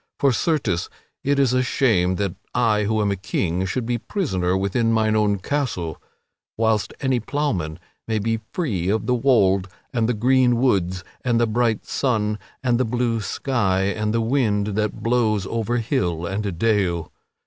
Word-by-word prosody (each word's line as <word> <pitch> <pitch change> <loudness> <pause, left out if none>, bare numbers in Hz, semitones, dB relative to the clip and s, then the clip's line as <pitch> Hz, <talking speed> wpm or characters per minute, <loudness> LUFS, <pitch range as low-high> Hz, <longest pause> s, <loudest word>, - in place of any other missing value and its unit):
For, 140 - +3
certes, 120 - 0 0.3
it 140 +1 +1
is 135 -3 +3
a 130 - +3
shame 110 -8 +2
that 100 -2 -1 0.2
I 110 -4 +2
who 110 +1 +1
am 100 - +1
a - - 0
king 90 0 -1
should 120 +5 -2
be 120 0 -1
prisoner 95 - -1
within 100 +4 +1
mine 110 -1 +2
own 105 -1 +2
castle, 95 - -3 0.6
whilst 110 -1 +1
any 130 -2 +1
ploughman 110 - -2 0.3
may 110 -1 0
be 115 +2 0
free 100 - -1
of 110 +2 0
the 125 - +1
wold 100 -7 +3 0.3
and 115 -1 +1
the 125 - +1
green 125 +2 +3
woods 95 -8 +1 0.2
and 120 -2 +2
the 120 - +4
bright 115 -1 0
sun 105 -5 0 0.2
and 120 -2 +2
the - - +3
blue 120 -1 0
sky 100 -3 0
and 105 +2 -1
the 115 +1 +1
wind 110 -4 +1
that 105 0 -2
blows 110 -4 +1
over 115 +3 -1
hill 105 - -1
and 95 -1 -3
dale. 90 -6 +1
110 Hz, 170 wpm, -22 LUFS, 95-125 Hz, 0.6 s, the